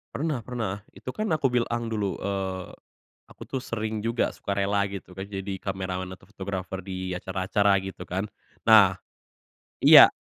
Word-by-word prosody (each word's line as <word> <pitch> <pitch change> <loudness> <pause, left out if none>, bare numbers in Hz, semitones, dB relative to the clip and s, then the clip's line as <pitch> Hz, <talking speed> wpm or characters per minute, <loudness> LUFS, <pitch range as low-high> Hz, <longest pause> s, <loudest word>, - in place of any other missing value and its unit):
Pernah 150 -5 -1
pernah. 110 -5 -4
Itu 130 - -8
kan 215 0 -2
aku 155 -4 +2
bilang 120 -1 0
dulu, 105 -5 -1
eee, 95 -2 -3 0.6
aku - - -19
tuh 130 - -3
sering 110 -4 -3
juga 115 +2 0
sukarela 100 0 0
gitu 95 -2 -8
kan, 95 +1 -6
jadi 95 0 -4
kameraman 95 -1 -3
atau - - -20
fotografer 95 -1 -5
di 95 -1 -4
acara-acara 95 +2 +1
gitu 95 0 -5
kan. 95 +3 -1 0.4
Nah 100 -4 +7 0.8
iya - - +10
100 Hz, 145 wpm, -27 LUFS, 95-110 Hz, 0.8 s, iya